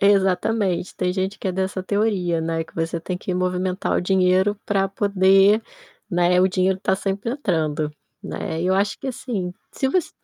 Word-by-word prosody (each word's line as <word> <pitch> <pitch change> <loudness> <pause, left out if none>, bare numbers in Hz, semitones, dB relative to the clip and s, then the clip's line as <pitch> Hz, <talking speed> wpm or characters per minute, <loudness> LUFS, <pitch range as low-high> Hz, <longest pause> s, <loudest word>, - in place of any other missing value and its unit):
exatamente 195 -1 +2
tem 180 -1 0
gente 190 +1 -2
que 190 - -3
é - - -1
dessa 190 0 -2
teoria, 190 -4 0
né. 165 0 -1
Que - - -20
você 165 +1 -2
tem 180 +2 -4
que 185 - -4
movimentar 185 +1 -1
o - - +2
dinheiro 190 +2 +2
para 195 -2 +1
poder, 195 +1 +4 0.5
né, 175 +1 +3
o 190 - +4
dinheiro 185 +1 +1
estar 190 0 +1
sempre 200 +4 -2
entrando, 155 - -1 0.3
né, 160 - -4
e 180 - 0
eu 190 - +3
acho 200 +2 0
que 275 - -7
assim, 215 -8 -3 0.2
se 265 - -1
você 355 +3 0
190 Hz, 180 wpm, -22 LUFS, 180-200 Hz, 0.5 s, poder